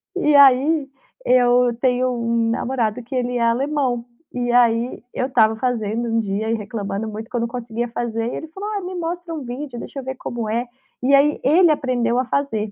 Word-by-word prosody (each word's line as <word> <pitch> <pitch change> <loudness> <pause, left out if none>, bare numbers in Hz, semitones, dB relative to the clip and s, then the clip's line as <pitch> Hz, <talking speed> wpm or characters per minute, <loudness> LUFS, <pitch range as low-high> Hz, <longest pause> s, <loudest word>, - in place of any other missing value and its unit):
E 300 -6 +2
aí, 280 +2 +5 0.4
eu 245 -1 +4
tenho 255 0 +2
um 230 -1 0
namorado 235 -1 -1
que 255 +3 -7
ele 245 -1 -1
é - - -1
alemão. 245 0 0 0.3
E 245 -1 -1
aí 240 0 +2
eu 255 - -1
estava 225 -4 +3
fazendo 230 -1 -1
um 225 - 0
dia 215 +1 -2
e - - +1
reclamando 205 -1 -4
muito 220 +2 -7
que 250 - -8
eu - - +1
não 235 - 0
conseguia 235 -1 -4
fazer, 230 0 -3
ele 320 - -5
falou: 390 +6 -6
"Olha, 410 -2 -2
me 370 - -5
mostra 345 0 -4
um 310 -3 -5
vídeo, 250 +1 -6
deixa 275 - -7
eu - - -7
ver 265 0 -4
como 235 -3 -5
é". 235 +3 -1 0.4
E 270 +2 +3
aí, 285 +2 +4
ele 330 +4 +5
aprendeu 245 -4 0
a 255 - 0
fazer. 225 -6 -1
245 Hz, 205 wpm, -21 LUFS, 230-275 Hz, 0.4 s, aí